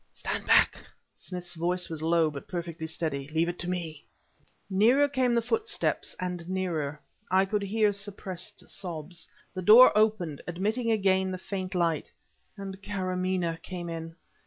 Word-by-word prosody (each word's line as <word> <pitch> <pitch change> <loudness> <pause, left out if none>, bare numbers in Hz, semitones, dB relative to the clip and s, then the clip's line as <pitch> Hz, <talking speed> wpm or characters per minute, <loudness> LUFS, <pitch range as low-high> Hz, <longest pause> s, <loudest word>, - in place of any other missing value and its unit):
"Stand - - -4
back!" - - +5 0.3
Smith's 180 -2 -5
voice 175 +2 0
was 160 -2 -5
low, 165 -1 +3
but 140 -1 -8
perfectly 170 -2 -4
steady. 155 -4 -2
"Leave 160 +2 +1
it 175 - -5
to 175 - -3
me!" 165 -4 -4 0.6
Nearer 230 +9 +4
came 260 -3 +1
the 235 - +2
footsteps 445 - -1
and 180 -1 -4
nearer. 165 -6 -2 0.3
I 190 +1 +4
could 205 +1 -1
hear 205 +1 +2
suppressed 200 0 -5
sobs. 170 -2 -4 0.3
The 185 - -4
door 220 +5 +9
opened, 210 -9 +2
admitting 215 +7 -1
again 190 -3 +2
the 185 - -3
faint 185 0 -5
light 165 -3 0 0.5
and 195 -1 -7
Karamaneh 185 -3 -1
came 175 -2 -6
in. 165 0 -6
185 Hz, 150 wpm, -28 LUFS, 165-200 Hz, 0.6 s, door